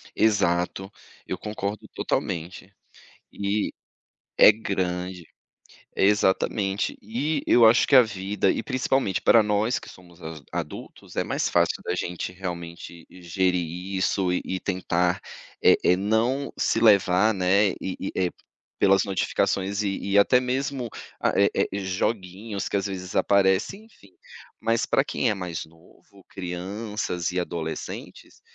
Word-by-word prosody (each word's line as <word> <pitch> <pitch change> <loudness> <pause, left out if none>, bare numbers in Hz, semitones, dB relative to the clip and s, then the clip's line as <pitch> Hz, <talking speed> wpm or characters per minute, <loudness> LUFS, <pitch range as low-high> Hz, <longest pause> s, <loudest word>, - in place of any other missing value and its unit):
Exato, 95 -2 +1 0.4
eu 95 - -4
concordo 105 0 -5
totalmente. 90 +4 -3 0.6
E 100 +1 -1 0.7
é - - +9
grande. 90 -4 -3 0.7
Exatamente. 100 0 +1
E, 135 +8 -2
eu 120 - +6
acho 110 +2 +5
que 140 - +4
a 130 - +10
vida, 100 -2 -1
e - - -2
principalmente 130 -5 0
para 115 - +6
nós 105 +3 +1
que - - -12
somos 90 -1 -16
as 80 -1 -8
adultos, - - -7
é - - +1
mais - - -1
fácil - - +1
da - - -2
gente 90 +1 -4
realmente 85 -2 -7
gerir 90 0 -1 0.3
isso 95 -1 +1
e 90 - 0
e 95 0 -3
tentar, 90 -2 0 0.4
eh - - +6
eh, 90 - +5
não 115 +7 0
se - - +1
levar, 105 -1 +4
né, 95 +2 +3
e 95 - -3
e, - - -4
eh, 90 -1 +1 0.5
pelas 95 0 +4
notificações 100 +1 0
e 100 -2 -1 0.2
e - - +5
até 125 +5 +5
mesmo 130 0 -2 0.3
ah, - - +1
eh - - +4
eh, 100 - 0
joguinhos 95 +1 -3
que - - 0
às 100 - -2
vezes 90 -2 -5
aparecem, 100 - +2
enfim. 100 - -21 0.5
Mas 115 0 +1
para 135 - +2
quem 130 -3 -1
é 105 - +2
mais 90 -4 -5
novo, 85 +4 -21
crianças 95 0 -4
e 90 - -1
adolescentes, 85 -2 -6
95 Hz, 140 wpm, -25 LUFS, 90-110 Hz, 0.7 s, a